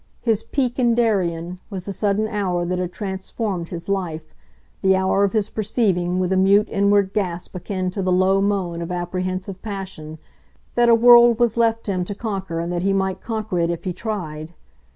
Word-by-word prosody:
His 225 -3 +1
"peak 255 -1 -2
in 240 -2 +3
Darien" 180 -6 0
was 190 -4 -6
the 200 - -4
sudden 210 +2 0
hour 190 -5 -1
that 180 +1 -2
had 180 -1 -2
transformed 190 -1 -4
his 170 -2 -7
life, 170 -6 -3 0.5
the 190 0 +4
hour 190 +1 +2
of 200 - +1
his 215 -2 0
perceiving 195 -5 0
with 185 0 0
a 190 - +2
mute 200 +3 +4
inward 200 -1 +2
gasp 180 -4 -3
akin 185 0 -3
to 195 - -3
the 185 -1 0
low 190 +2 +3
moan 190 -4 -1
of 170 - -5
apprehensive 185 +2 -3
passion, 190 -7 -6 0.6
that 240 0 +3
a 230 - +7
world 240 0 +7
was 235 -2 +2
left 230 -1 +1
him 185 -3 -1
to 205 - -5
conquer 195 -6 -4
and 170 +1 -3
that 175 - -1
he 195 +2 +1
might 190 -1 -1
conquer 220 -5 -3
it 170 0 +1
if 170 -1 -3
he 185 - -2
tried. 170 -6 -5
190 Hz, 195 wpm, -21 LUFS, 180-215 Hz, 0.6 s, a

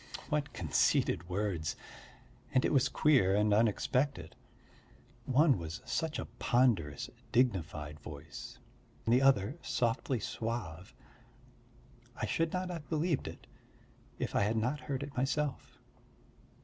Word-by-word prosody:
What 150 -1 0
conceited 85 +1 +1
words! 90 -4 -1 0.8
And 130 - +4
it - - +1
was 130 -1 +4
queer 130 -11 +4
and 105 0 +3
unexpected. 115 - +1 0.9
One 135 - +4
was 85 -1 -5
such 160 -1 -1
a - - -3
ponderous, 110 - +1 0.2
dignified 80 - 0
voice, 70 -1 -9 0.5
the 120 +3 +4
other 135 - +3
softly 120 +1 0
suave; 105 -8 -4 1.2
I - - -2
should 165 0 0
not 180 0 -2
have 165 -4 -7
believed 160 -1 0
it - - -9 0.7
if - - -3
I - - +4
had 105 +3 +1
not 125 +7 0
heard 140 -2 -3
it 140 0 -8
myself. 135 +2 -1
120 Hz, 120 wpm, -33 LUFS, 95-140 Hz, 1.2 s, And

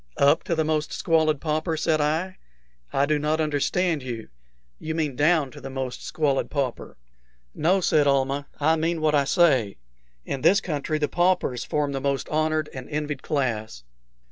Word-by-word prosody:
"Up 145 +4 +4
to 170 - 0
the 160 - +1
most 155 -1 -1
squalid 160 -3 +1
pauper?" 155 +2 -1
said 155 0 +1
I. 160 +5 -1 0.5
"I 140 - +2
do 150 0 +1
not 155 +2 0
understand 155 +2 0
you. 120 -3 -6 0.5
You 160 0 -4
mean 150 -5 -1
down 150 -1 +2
to - - -12
the 135 - -7
most 130 -1 -5
squalid 145 -4 0
pauper." 135 -5 -3 0.6
"No," 185 +5 +2
said 150 -4 +3
Almah; 140 +1 +1
"I 160 +2 +3
mean 165 +1 0
what 155 -1 +1
I 140 -2 +3
say. 135 - +3 0.5
In 135 - -4
this 200 +9 +5
country 155 -3 -2
the 150 -1 0
paupers 175 -9 +1
form 145 -1 -1
the 135 -1 -3
most 140 0 -1
honored 155 0 0
and 130 -1 -8
envied 150 -2 -3
class." 110 - -2
150 Hz, 170 wpm, -25 LUFS, 140-160 Hz, 0.6 s, this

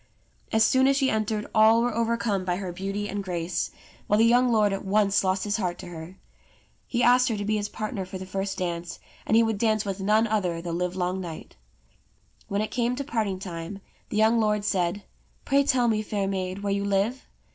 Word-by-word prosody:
As 220 0 +4
soon 260 +3 +4
as 275 0 +3
she 270 -2 +2
entered 215 -1 -1
all 220 +1 +5
were 245 -1 0
overcome 230 -3 0
by 180 -1 -1
her 185 -1 -4
beauty 195 +3 -3
and 205 0 -4
grace, 175 -2 -2 0.4
while 210 - +3
the 225 - +5
young 245 +1 +4
lord 210 -3 +3
at 195 - -4
once 200 0 +2
lost 190 0 0
his 205 +1 -1
heart 180 -4 -2
to 180 - -9
her. 170 +2 -9 0.7
He 245 0 0
asked 250 +1 +5
her 220 - -1
to 205 - -3
be 215 +1 +1
his 205 0 -3
partner 215 -3 -4
for 185 +1 -7
the 185 - -7
first 195 +1 -3
dance; 170 -1 -4 0.3
and 220 - +4
he 230 - +6
would 225 -2 -1
dance 215 -2 +1
with 195 -1 -3
none 210 +3 +3
other 195 -6 -1
the 170 0 -5
livelong 180 +1 -1
night. 170 -3 -8 0.9
When 200 +1 -1
it 215 - -3
came 245 0 0
to 280 - -3
parting 220 -8 -1
time, 175 0 -6 0.3
the - - -3
young 220 +2 +4
lord 210 -2 +1
said, 185 0 0 0.2
" - - -37
Pray 280 0 +3
tell 255 -3 +2
me, 215 -2 +1
fair 205 -2 -2
maid, 190 0 -3
where 200 -1 0
you 200 0 -1
live 200 +6 0
205 Hz, 220 wpm, -26 LUFS, 185-225 Hz, 0.9 s, he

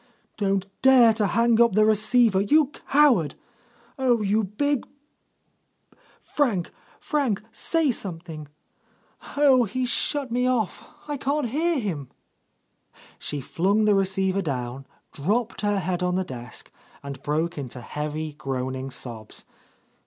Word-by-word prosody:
Don't 195 -2 0 0.2
dare 255 -4 +7
to 215 -2 +1
hang 230 +3 +3
up 235 -4 +5
the 215 +2 +4
receiver, 220 -1 +3
you 290 +7 +3 0.2
coward! 270 - +4 0.6
Oh, 245 -4 +2
you 210 +2 +2
big... 255 +8 -1 1.3
Frank, 225 - -1 0.3
Frank, 260 -10 -1
say 325 +1 +1
something! 165 -7 -6 0.9
Oh, 265 -4 +5
he's 250 +4 -2
shut 280 0 -1
me 250 +1 +1
off, 230 -7 -1 0.2
I 295 -1 -3
can't 280 -1 -1
hear 325 +6 +1
him!" 175 - -3 1.1
She 145 -2 -4
flung 200 +10 +1
the 210 - +4
receiver 190 0 +1
down, 130 -4 -4 0.2
dropped 215 - -1
her 205 -1 +1
head 185 -1 -2
on 180 0 0
the 190 - +1
desk, 125 -6 -9 0.3
and 140 -1 -7
broke 155 +3 -1
into 130 -2 -6
heavy, 150 +4 -4
groaning 130 -1 -4
sobs. 115 -4 -7
200 Hz, 125 wpm, -25 LUFS, 155-245 Hz, 1.3 s, dare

